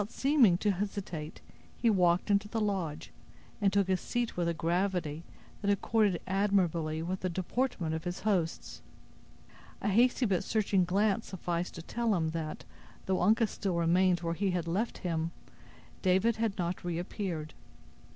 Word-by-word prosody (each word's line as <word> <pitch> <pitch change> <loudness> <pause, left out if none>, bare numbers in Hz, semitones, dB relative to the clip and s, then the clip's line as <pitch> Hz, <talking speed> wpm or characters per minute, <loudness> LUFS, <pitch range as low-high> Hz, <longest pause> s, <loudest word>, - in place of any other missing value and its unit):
Without 205 +3 -6
seeming 265 - +4
to 205 +2 +1
hesitate, 185 -5 -4 0.4
he 235 - 0
walked 180 -2 +3
into 200 +1 +2
the 225 +1 -2
lodge, 180 -7 -2 0.5
and 200 -1 +3
took 200 -1 +2
his 185 -1 +1
seat 240 -1 -2
with 175 -1 0
a 170 - +1
gravity 170 -2 -1 0.4
that 200 - 0
accorded 205 -2 +2
admirably 175 -5 +1
with 185 +2 -3
the 185 - -2
deportment 185 -1 -1
of 160 0 -3
his 175 0 -4
hosts. 185 -6 -1 1.0
A - - -1
hasty 245 +5 +3
but 195 -3 +1
searching 200 -3 +1
glance 200 +4 +1
sufficed 175 -1 -3
to 165 - -7
tell 230 +2 0
him 160 -3 0
that, 160 -2 -5 0.4
though 190 -1 0
Uncas 220 +4 +3
still 190 -4 -2
remained 175 +1 +3
where 165 -1 -1
he 195 +3 0
had 175 -2 -1
left 200 +8 -1
him, 165 -1 0 0.7
David 190 +5 +3
had 220 -3 -1
not 175 -1 -2
reappeared. 175 -2 -4
185 Hz, 160 wpm, -31 LUFS, 170-205 Hz, 1.0 s, seeming